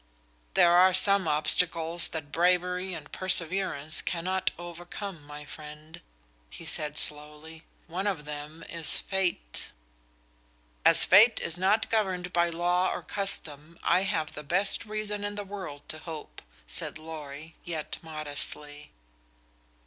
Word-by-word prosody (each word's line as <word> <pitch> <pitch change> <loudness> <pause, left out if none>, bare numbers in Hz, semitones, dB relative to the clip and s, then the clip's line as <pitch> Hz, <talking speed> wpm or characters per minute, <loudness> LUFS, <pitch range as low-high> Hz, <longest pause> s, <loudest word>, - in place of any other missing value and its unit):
"There 170 - +7
are 185 +1 +7
some 200 -2 +4
obstacles 165 +2 +1
that 155 -3 -6
bravery 180 +2 +2
and 150 -2 -9
perseverance 170 -4 +1
cannot 185 +2 0
overcome, 175 0 -7
my 150 0 -9
friend," 150 +3 -10 0.5
he 165 - -11
said, 150 -2 -2
slowly. 150 +2 -3 0.2
"One 185 +5 -3
of 170 -7 -1
them 150 +2 -7
is 165 -2 +4
fate." 180 - -1 1.2
"As - - +7
fate 215 +5 +7
is 165 - -3
not 195 +5 +2
governed 185 -5 0
by 170 0 +3
law 175 +2 +2
or - - -4
custom, 165 -5 -2
I 180 - +4
have 160 -5 -1
the - - -6
best 185 +9 +1
reason 210 -1 -3
in 205 0 -3
the 205 - -3
world 185 -8 -7
to 155 - -3
hope," 160 -2 -8 0.2
said - - -3
Lorry, 155 -1 -8
yet 160 -3 -4
modestly. 150 -1 -4
170 Hz, 130 wpm, -29 LUFS, 150-185 Hz, 1.2 s, There